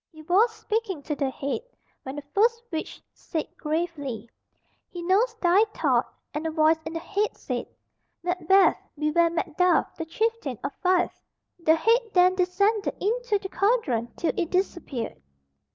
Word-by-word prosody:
He 315 -1 -13
was 395 +8 +4
speaking 430 -8 -3
to 300 - -2
the 280 -2 0
head, 275 +5 -3 0.4
when 265 +1 -7
the 290 - -6
first 460 +3 +3
witch 320 -1 -5
said 315 - -4
gravely, 300 -8 -3 0.6
"He 350 -1 -7
knows 425 +7 +2
thy 385 -1 +4
thought," - - +1 0.2
and 310 +2 -2
a - - 0
voice 315 0 +3
in 320 - -5
the 330 - -2
head 410 +5 -1
said, - - -4 0.6
"Macbeth, 365 +2 +4 0.2
beware 305 +3 +3
Macduff, 345 +1 +1
the 325 - -4
chieftain 425 - -1
of 275 - -3
Fife." 365 -1 +1 0.4
The 320 -1 +4
head 455 +9 +4
then 365 0 +5
descended 395 +3 +1
Into 465 +1 0
the 390 -1 -7
cauldron 330 - +1
till 340 - 0
it 340 - -1
disappeared. 345 - -2
350 Hz, 150 wpm, -26 LUFS, 310-400 Hz, 0.6 s, then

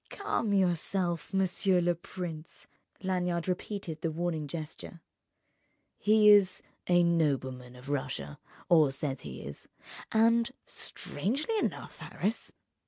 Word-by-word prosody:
"Calm 405 - -1
yourself, 180 -2 +1
monsieur 190 -1 +2
le 175 0 +2
prince." 170 -2 -7 0.4
Lanyard 180 -2 0
repeated 180 -3 -3
the 165 - 0
warning 160 -2 -2
gesture. 160 +2 -7 1.0
"He 215 0 +5
is 200 -3 +6 0.2
a 175 -1 +5
nobleman 130 -7 0
of 125 +2 -13
Russia, 130 - -3 0.3
or 160 -4 +6
says 135 0 -3
he - - -8
is, 70 +1 -7 0.4
and—strangely 235 - 0
enough, - - -3
Harris! 215 +5 -2
175 Hz, 105 wpm, -30 LUFS, 155-195 Hz, 1.0 s, is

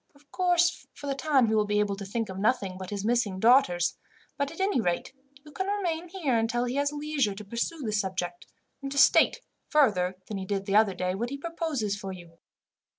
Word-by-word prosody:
Of 285 0 -25
course, 350 -1 +2
for - - -10
the 280 - -1
time 275 -2 +3
he 220 - 0
will 210 -1 +2
be 210 0 +1
able 205 -1 +1
to 200 - -6
think 225 +2 -2
of 190 0 -7
nothing 200 -3 +1
but 185 0 -7
his 205 -1 -4
missing 225 -5 +1
daughters; 190 -7 +4 0.4
but 280 0 -1
at 330 - -11
any 385 - +2
rate, 175 +4 -2 0.3
you 300 - -13
can 380 +6 -3
remain 355 -4 -2
here 305 -11 0
until 230 +2 0
he 245 - -3
has 285 0 +1
leisure 295 -8 -1
to 210 +1 -9
pursue 235 +9 -3
the 220 - -2
subject, 185 -3 -2 0.3
and 275 0 -5
to 280 - -4
state, 260 -1 +5 0.3
further 205 - +3
than 205 -2 -4
he 190 - -5
did 200 0 -2
the 200 0 0
other 210 -3 +4
day, 180 0 -1
what 235 +5 -3
he 280 - -5
proposes 300 -9 -2
for 195 -2 -6
you. 170 -3 -12
230 Hz, 220 wpm, -28 LUFS, 195-290 Hz, 0.4 s, state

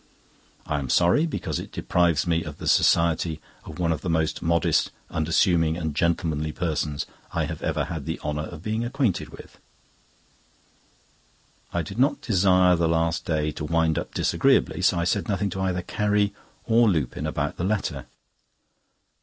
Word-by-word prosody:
I 75 - -1
am 70 -2 -5
sorry, 90 - +3
because 155 - -3
it - - -8
deprives 85 -3 +1
me 85 -1 +1
of - - -8
the - - -8
society 85 -1 +3 0.3
of - - -9
one 85 -2 0
of 80 -2 -2
the 90 - -3
most 80 -1 0
modest, 85 -1 +2 0.2
unassuming, 80 0 +2
and 80 -4 -3
gentlemanly 80 -2 0
persons 75 -4 -2 0.3
I - - 0
have - - -6
ever - - -1
had 80 -4 -6
the 80 - -3
honour 75 0 -3
of 85 -1 -10
being 110 +2 -1
acquainted 120 - -1
with." - - -14 2.1
I 85 - -1
did 95 +9 -7
not 135 +3 +3
desire 90 -3 +4
the 85 -1 +1
last 80 0 0
day 75 -3 0
to 75 - -7
wind 80 0 +1
up - - -8
disagreeably, - - +2
so - - +3
I 85 - +1
said 95 +3 0
nothing 100 -1 0
to 95 - -4
either 90 -2 -1
Carrie 105 0 0 0.3
or 115 0 +4
Lupin 75 -10 -1
about - - -2
the - - -3
letter. 90 - -2
85 Hz, 165 wpm, -25 LUFS, 80-95 Hz, 2.1 s, desire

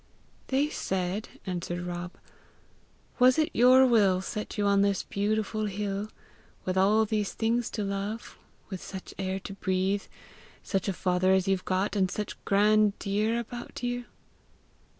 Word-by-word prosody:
"They 275 +2 +2
said," 190 -1 -2 0.2
answered 175 -1 -3
Rob, 175 0 -5 0.5
" - - -34
'Was 250 +1 +6
it 310 -1 +2
your 255 +2 +7
will 205 -7 +4
set 210 +3 -5
you 205 - +1
on 200 0 +4
this 200 -1 +1
beautiful 215 +1 -1
hill, 205 +1 -3 0.6
with 185 - -1
all 205 +4 +4
these 210 -2 -1
things 230 +1 0
to 215 - -3
love, 200 +3 -4 0.4
with 190 - -5
such 190 -1 -8
air 190 0 -2
to 195 - -7
breathe, 195 +1 0 0.6
such 195 -1 -1
a 195 - +1
father 185 +1 +2
as 190 0 +2
you've 195 -1 0
got, 190 +3 0
and 190 -2 +2
such 210 +2 -4
grand 210 +1 +4
deer 215 +3 0
about 240 +1 -7
you?' 245 0 -2
200 Hz, 150 wpm, -28 LUFS, 190-220 Hz, 0.6 s, your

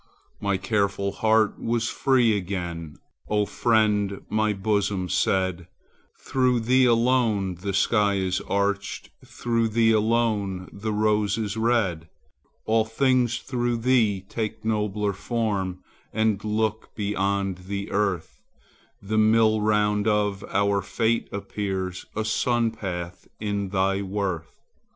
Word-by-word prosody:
My 100 -1 0
careful 100 +1 0
heart 110 +1 +2
was 115 0 0
free 125 -5 +3
again,— 85 -5 -4 0.3
O 105 -1 +2
friend, 105 -3 +1
my 110 0 +1
bosom 100 -2 -1
said, 95 0 0 0.5
Through 125 -2 +1
thee 130 +3 +4
alone 115 -5 +2
the 100 +1 -2
sky 105 0 +2
is 95 -1 -1
arched, 100 0 -1
Through 115 -1 -1
thee 115 +1 +3
the 110 -3 0
rose 105 -1 +1
is 105 -2 -2
red, 110 -8 0 0.6
All 110 0 +3
things 120 +1 +1
through 120 -2 -2
thee 115 -5 +2
take 110 0 -4
nobler 105 -2 0
form 100 -4 -2 0.3
And 110 -2 0
look 110 0 -1
beyond 100 -2 -1
the 100 +1 -4
earth, 100 -5 -1 0.6
The 110 +2 0
mill 110 0 +4
round 105 0 +2
of 105 -2 +1
our 100 0 +1
fate 115 +4 0
appears 95 -2 -4
A 110 0 -1
sun 115 +1 +1
path 90 -5 -6
in 100 -2 -2
thy 95 0 +1
worth. 95 -4 -3
105 Hz, 120 wpm, -25 LUFS, 100-110 Hz, 0.6 s, thee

